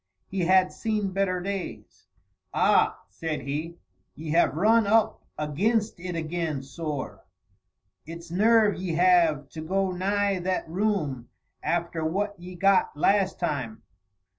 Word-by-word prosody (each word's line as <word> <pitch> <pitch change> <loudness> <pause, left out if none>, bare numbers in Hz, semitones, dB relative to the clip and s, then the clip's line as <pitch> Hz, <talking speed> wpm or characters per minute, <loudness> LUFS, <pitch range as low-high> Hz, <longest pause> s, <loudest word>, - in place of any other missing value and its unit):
He 195 - -4
had 185 +1 +4
seen 210 -3 -2
better 185 -1 0
days. 195 0 -6 0.5
"Ah!" - - +3
said 155 - -4
he; 155 +5 -4 0.4
"ye 155 0 -6
have 165 -4 +3
run 215 +5 +4
up 220 +1 +2 0.2
aginst 205 +9 0
it 180 0 -5
agin, 160 -3 -3
sorr. 145 0 -5 0.8
It's 165 0 -9
nerve 215 +2 +4
ye 180 -3 -3
have, 170 -5 +3
to 155 - -8
go 190 +4 0
nigh 200 +1 0
that 185 0 -2
room 160 - -1 0.3
after 170 -1 -1
what 200 +6 -1
ye 180 +1 -9
got 195 -4 +2
last 195 +4 +2
time." 130 -10 -3
180 Hz, 130 wpm, -26 LUFS, 160-195 Hz, 0.8 s, had